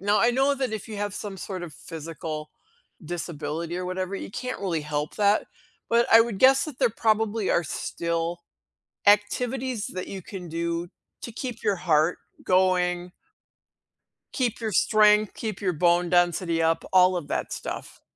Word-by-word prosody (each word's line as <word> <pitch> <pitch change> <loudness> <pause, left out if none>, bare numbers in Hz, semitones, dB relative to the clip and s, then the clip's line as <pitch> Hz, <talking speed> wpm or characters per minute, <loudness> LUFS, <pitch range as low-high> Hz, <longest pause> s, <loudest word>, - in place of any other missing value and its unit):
now, 205 +2 +2
I 235 - +5
know 270 +3 +2
that 260 -4 -2
if 220 0 -5
you 215 - -6
have 205 -1 -3
some 205 -2 -6
sort 185 0 -6
of 170 -3 -7
physical 155 -1 -7 0.5
disability 165 0 -4
or 180 - -3
whatever, 185 +1 -3
you - - -7
can't 255 +5 -5
really 180 -5 -1
help 150 0 -3
that, 205 0 +3 0.4
but 235 +1 +3
I 225 - +10
would 225 -4 0
guess 265 +3 +6
that 300 -5 -8
there 255 -4 +3
probably 220 -1 +1
are 170 - +2
still 170 +2 -3 0.7
activities 235 +3 +2
that 185 0 -6
you 195 - -6
can 180 -1 -8
do 170 +1 -2 0.3
to 235 - -6
keep 240 0 -6
your 205 -2 +2
heart 165 -1 +2 0.3
going 180 -1 +2 1.2
keep 245 -5 -1
your 220 -2 -2
strength, 210 +1 +4
keep 215 -4 -5
your 185 -3 0
bone 175 +1 +2
density 175 -1 +2
up, 165 0 +1
all 185 0 +5
of 170 -5 -4
that - - -2
stuff. - - -7
185 Hz, 165 wpm, -26 LUFS, 170-220 Hz, 1.2 s, I